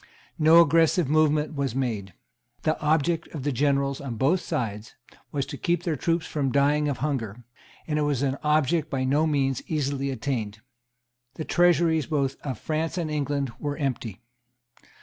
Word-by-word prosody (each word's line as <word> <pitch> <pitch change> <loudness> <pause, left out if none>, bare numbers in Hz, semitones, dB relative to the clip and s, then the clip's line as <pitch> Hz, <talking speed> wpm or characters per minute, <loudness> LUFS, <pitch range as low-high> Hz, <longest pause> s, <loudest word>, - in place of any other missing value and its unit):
No 160 +2 +7
aggressive 165 0 +3
movement 155 0 +2
was 140 -4 -2
made. 110 -8 -3 0.5
The 155 - +2
object 160 +2 +1
of 140 - -5
the 145 - 0
generals 140 0 0
on 130 -4 -5
both 140 +11 +2
sides 110 -6 -4 0.4
was 140 -2 -1
to - - -7
keep 175 0 0
their 165 -3 -1
troops 165 +3 0
from 140 -4 -1
dying 145 +2 +2
of 140 -3 -1
hunger; 120 -6 -3 0.4
and 150 -1 -1
it - - +1
was 145 -3 0
an 135 0 -1
object 155 +1 +2
by 130 -1 -1
no 145 +4 +2
means 135 -4 0
easily 140 -3 -1
attained. 115 -4 -3 0.8
The 155 - -5
treasuries 170 -3 +3
both 140 -4 0
of 135 -3 -4
France 160 +2 -2
and 165 -3 -2
England 140 -3 -1
were 145 -1 -3
empty. 120 -8 -3
145 Hz, 165 wpm, -26 LUFS, 135-155 Hz, 0.8 s, No